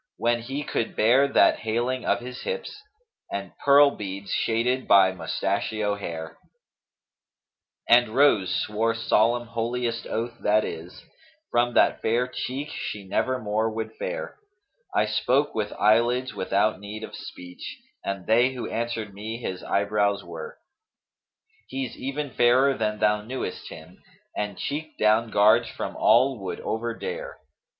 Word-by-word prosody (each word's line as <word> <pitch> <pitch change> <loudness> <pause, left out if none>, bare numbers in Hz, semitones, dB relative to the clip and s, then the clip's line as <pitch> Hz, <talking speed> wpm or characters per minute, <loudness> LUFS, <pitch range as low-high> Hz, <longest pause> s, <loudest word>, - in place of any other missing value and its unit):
When 120 0 +1
he 135 +5 -4
could 115 - -2
bear 125 +6 +4
that 140 - +4
haling 120 +3 -1
of - - +1
his 125 +1 -8
hips 475 -3 -5 0.2
* 450 - -30
And 100 -2 -5
pearl 140 0 +7
beads 100 -3 -6
shaded 125 +3 0
by 95 -2 +6
mustachio 100 +3 -1
hair;[FN#237] 85 -5 -7 1.4
And 120 -1 +5
Rose 130 -10 +4 0.2
swore 115 +2 0
solemn, 115 +1 +2
holiest 115 0 -2
oath 115 +1 -3
that 105 +1 +2
is, 85 +3 -8 0.2
* 320 0 -33
From 120 0 +1
that - - +4
fair 120 +3 +1
cheek 130 +3 -4
she 100 -9 -5
nevermore 110 0 0
would 110 0 -5
fare - - -5 0.5
I - - +2
spoke 140 +3 +1
with 105 -2 -2
eyelids 120 +4 +2
without 100 +1 0
need 105 +2 -8
of - - -7
speech, 90 0 -10 0.3
* - - -48
And 100 -2 -4
they 120 +4 +3
who 125 - -4
answered 115 -3 -3
me 110 +3 -6
his 95 -6 -5
eyebrows 100 0 0
were. 80 -2 -8 1.1
He's 130 -2 -4
even 140 +1 -4
fairer 130 +4 +4
than 105 -2 -1
thou 105 0 +2
knewest 125 +5 -5
him, 80 +3 -12 0.2
* - - -37
And 105 -2 -3
cheek 155 +2 -4
down 110 +2 +3
guards 105 0 +4
from - - -5
all 125 +2 +4
would 95 -2 -5
overdare. 115 +1 -4
115 Hz, 145 wpm, -25 LUFS, 105-125 Hz, 1.4 s, pearl